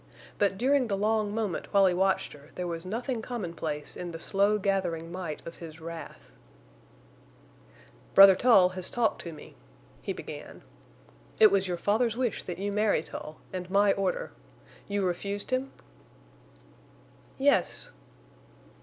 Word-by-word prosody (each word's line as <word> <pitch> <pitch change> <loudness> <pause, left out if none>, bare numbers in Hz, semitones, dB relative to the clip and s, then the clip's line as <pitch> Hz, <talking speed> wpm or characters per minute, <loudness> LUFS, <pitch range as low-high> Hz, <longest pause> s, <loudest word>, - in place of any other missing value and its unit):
But 195 -2 +2
during 265 +2 +2
the 200 -3 -1
long 215 0 +1
moment 210 -4 -3
while 200 -1 +5
he 185 - +4
watched 190 +1 +1
her 145 0 -15
there 180 - -3
was 170 0 -5
nothing 235 +3 -3
commonplace 170 -10 -4
in 180 - -5
the 165 - -6
slow 200 +4 +2
gathering 180 -5 -1
might 175 -4 -6
of 165 - -8
his 160 -1 -10
wrath. 165 0 -8 1.9
"Brother 195 0 +10
Tull 195 -4 +5
has 185 -1 -5
talked 235 -2 0
to 170 - -7
me," 155 - -12 0.5
he - - -3
began. - - -8 0.8
"It 215 -2 +8
was 195 -1 +2
your 175 -1 -2
father's 220 +5 +1
wish 250 -4 -1
that 175 -2 -5
you 200 +2 -2
marry 210 -5 +2
Tull, 155 -1 -8 0.2
and 180 -1 -5
my 200 +1 +4
order. 195 -2 -2 0.6
You 200 -1 -1
refused 200 +5 -3
him?" 260 +1 -1 1.7
"Yes." 270 -9 +1
195 Hz, 145 wpm, -28 LUFS, 175-215 Hz, 1.9 s, Brother